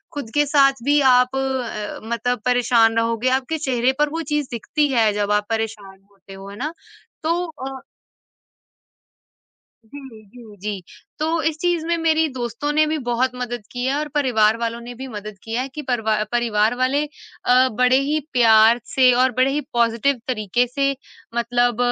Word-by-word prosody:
ख़ुद 280 -6 -6
के 295 - +4
साथ 275 -3 +3
भी 290 +2 +3
आप 250 +1 +3
अ, 260 -6 -3
मतलब 235 0 -1
परेशान 245 -2 +3
रहोगे, 230 +2 +1
आपके 265 +5 -1
चेहरे 260 -4 +1
पर 295 0 +3
वो 325 +2 -4
चीज़ 295 -3 0
दिखती 290 +5 -1
है 225 -3 +3
जब 205 0 -1
आप 210 0 +1
परेशान 215 -4 -4
होते 195 0 -15
हो, 195 +1 -10
है 200 - -10
ना? 305 +7 -4 0.5
तो 330 +2 +1 0.3
अ 270 0 -6 2.0
जी, 255 -2 -12
जी, 225 -2 -14
जी। 205 -2 -4 0.4
तो 320 +2 0
इस 320 -1 0
चीज़ 345 -2 0
में 340 - +1
मेरी 320 -1 +2
दोस्तों 245 +4 -3
ने 310 0 +4
भी 310 0 -1
बहुत 245 +2 +1
मदद 245 -2 -5
की 245 0 -4
है 265 - +1
और 300 +1 -2
परिवार 230 -6 +3
वालों 230 0 -3
ने 240 +1 -8
भी 265 +2 -7
मदद 210 -3 -8
की 225 - -7
है, 250 +3 -1
कि 300 +3 -7
परवा 220 -5 0
परिवार 230 -1 +1
वाले 260 +4 +1 0.4
अ, 255 +1 +4
बड़े 250 +3 +3
ही 295 +3 0
प्यार 225 -1 +5
से 255 -1 +4
और 255 +1 +3
बड़े 260 +1 +3
ही 295 +2 -1
पॉज़िटिव 235 +3 +1
तरीक़े 240 -1 0
से 275 +3 0 0.5
मतलब 240 0 +1
245 Hz, 175 wpm, -21 LUFS, 225-275 Hz, 2.0 s, प्यार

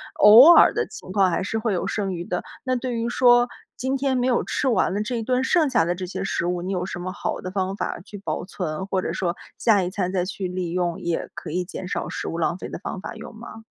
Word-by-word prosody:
偶 230 +10 +9
尔 - - +7
的 - - 0
情 185 - -10
况 190 -3 +3
还 - - 0
是 225 - -2
会 220 -2 -1
有 180 - -1
剩 195 -3 -2
余 170 -1 -5
的。 180 - -3 0.2
那 255 - +1
对 250 0 -3
于 230 0 -1
说， 245 0 +5 0.3
今 260 +2 -1
天 270 -1 0
没 250 0 +1
有 250 - +2
吃 - - -1
完 210 -6 +2
的 205 - -1
这 240 +3 -3
一 230 - -2
顿 255 +2 +1
剩 320 +3 +3
下 230 -11 +3
的 175 +1 0
这 185 +1 -5
些 180 - -5
食 195 - -1
物， 175 0 -1
你 185 +2 -4
有 180 -2 -1
什 185 - -6
么 185 +1 -4
好 - - -3
的 185 - -5
方 190 0 -2
法 - - -3
去 205 - -13
保 - - -3
存？ 180 -2 -4
或 190 -1 -1
者 - - -3
说 175 -1 -1 0.2
下 210 -4 +3
一 180 - -1
餐 185 -2 -2
再 185 -2 0
去 190 0 -4
利 180 -1 -3
用， 175 -1 -1
也 170 -1 -2
可 - - -8
以 180 +4 -1
减 185 0 -7
少 - - -3
食 - - -5
物 165 - -3
浪 170 +1 0
费 - - -6
的 - - -5
方 - - -6
法， 210 +3 -7
有 220 - -9
吗？ 225 0 -11
195 Hz, 295 characters per minute, -23 LUFS, 180-235 Hz, 0.3 s, 偶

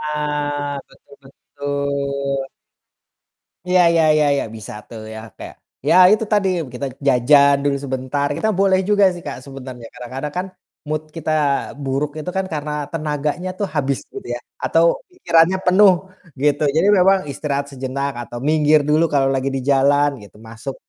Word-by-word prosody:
Nah, 145 -1 -2
betul 140 - -20
betul. 140 0 -3 1.2
Iya 180 0 +3
iya 165 -1 +3
iya 150 - +3
iya, 140 - 0
bisa 110 -3 -8 0.2
tuh 115 -2 -9
ya 110 - -7 0.2
kayak, - - -9 0.3
ya - - +5 0.2
itu 215 +1 +3
tadi 205 -2 +2 0.3
kita 125 +3 -4 0.2
jajan 140 +2 +5
dulu 145 -1 +1
sebentar. 130 +1 -2
Kita 220 - 0
boleh 190 -1 +4
juga 205 -1 +4
sih 175 - -9
Kak, - - -5
sebenarnya, 130 -3 -9
kadang-kadang 130 +4 -6
kan 180 - -1 0.4
mood 155 0 -1 0.2
kita 160 -1 -2 0.5
buruk 135 +2 -1
itu 155 - -5
kan 190 - 0
karena 150 0 -3 0.2
tenaganya 155 +3 -2
tuh 205 - 0
habis 135 -1 0
gitu 400 - -8
ya, - - -4 0.3
atau - - +3 0.3
pikirannya 175 - +3
penuh 190 +2 +6 0.5
gitu. 145 0 +2
Jadi 170 +5 +3
memang 190 +1 +5
istirahat 140 -1 -2
sejenak 135 +1 -3
atau 120 0 -9
minggir 155 0 +4
dulu 155 +2 +4
kalau 135 -1 +3
lagi 135 +1 -1
di 135 - -2
jalan 145 +1 +4
gitu, 100 - -16
masuk 115 +4 -7
145 Hz, 155 wpm, -20 LUFS, 135-160 Hz, 1.2 s, penuh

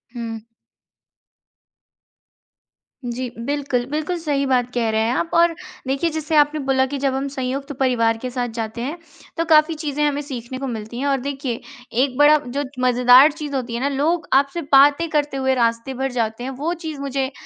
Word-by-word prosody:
हुँ। 225 -2 -6 2.6
जी, 245 +1 -4 0.2
बिल्कुल, 275 -3 -1
बिल्कुल 310 +4 -2
सही 290 -4 -1
बात 250 -2 +1
कह 235 -2 0
रहे 220 0 +1
हैं 225 +2 +1
आप 330 - -1
और 340 0 +4 0.3
देखिए 275 +5 0
जैसे 315 0 -3
आपने 295 +1 +4
बोला 265 -1 +3
कि - - -1
जब 275 -1 0
हम 270 +1 -2
संयुक्त 275 +1 -4
परिवार 230 -4 +2
के 255 +3 -5
साथ 245 -1 -2
जाते 225 +1 -4
हैं, 285 +8 -4 0.4
तो 330 - 0
काफ़ी 310 0 +4
चीज़ें 300 -1 -2
हमें 290 0 0
सीखने 260 -3 -7
को 275 - -4
मिलती 225 0 -6
हैं 280 - -1
और 275 -1 +2
देखिए 270 -3 -4 0.4
एक 260 -2 -2
बड़ा 295 +1 +7
जो 280 +4 -2 0.2
मज़ेदार 250 +3 +7
चीज़ 295 -2 -6
होती 245 -3 -3
हैं 235 - -3
ना 280 - +1
लोग 320 +5 0
आपसे 275 +5 +2
बातें 285 +4 +6
करते 295 -2 0
हुए 265 0 +1
रास्ते 230 +1 0
भर 265 +1 -2
जाते 230 -1 -2
हैं, 260 - -3
वो 295 +6 -2
चीज़ 320 -4 -7
मुझे 275 -1 -2
270 Hz, 185 wpm, -21 LUFS, 245-295 Hz, 2.6 s, बड़ा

